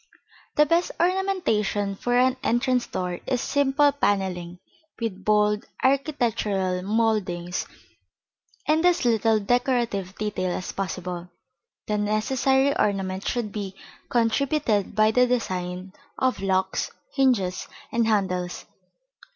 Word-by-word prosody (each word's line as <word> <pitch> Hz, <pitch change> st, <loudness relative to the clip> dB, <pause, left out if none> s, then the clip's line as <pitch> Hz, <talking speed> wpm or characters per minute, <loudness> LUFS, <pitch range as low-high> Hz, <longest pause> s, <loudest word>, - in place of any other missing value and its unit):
The 300 Hz, -, +5 dB
best 335 Hz, +4 st, +2 dB
ornamentation 340 Hz, -, +1 dB
for 245 Hz, +5 st, 0 dB
an 255 Hz, +1 st, +4 dB
entrance 245 Hz, 0 st, +1 dB
door 180 Hz, -1 st, -3 dB
is 255 Hz, -2 st, +1 dB
simple 285 Hz, +2 st, +3 dB
panelling, 190 Hz, -9 st, -1 dB, 0.4 s
with 205 Hz, -5 st, -4 dB
bold 210 Hz, 0 st, +2 dB, 0.2 s
architectural 230 Hz, -9 st, +1 dB
mouldings 190 Hz, -4 st, 0 dB, 1.0 s
and 315 Hz, +2 st, +3 dB
as 355 Hz, -6 st, +3 dB
little 225 Hz, -1 st, +3 dB
decorative 235 Hz, -4 st, 0 dB
detail 185 Hz, -4 st, -2 dB
as 180 Hz, -, -5 dB
possible. 180 Hz, -2 st, -4 dB, 0.6 s
The 210 Hz, -1 st, -1 dB
necessary 265 Hz, +6 st, +2 dB
ornament 195 Hz, -2 st, 0 dB
should 235 Hz, -4 st, -1 dB
be 195 Hz, -2 st, -5 dB, 0.3 s
contributed 235 Hz, -3 st, +1 dB
by 215 Hz, 0 st, +4 dB
the 250 Hz, +2 st, +4 dB
design 185 Hz, -6 st, -2 dB, 0.2 s
of 255 Hz, -6 st, 0 dB
locks, 190 Hz, -1 st, 0 dB, 0.2 s
hinges 225 Hz, -10 st, +1 dB, 0.2 s
and 230 Hz, -1 st, +1 dB
handles. 185 Hz, -4 st, -1 dB
215 Hz, 110 wpm, -25 LUFS, 190-255 Hz, 1.0 s, The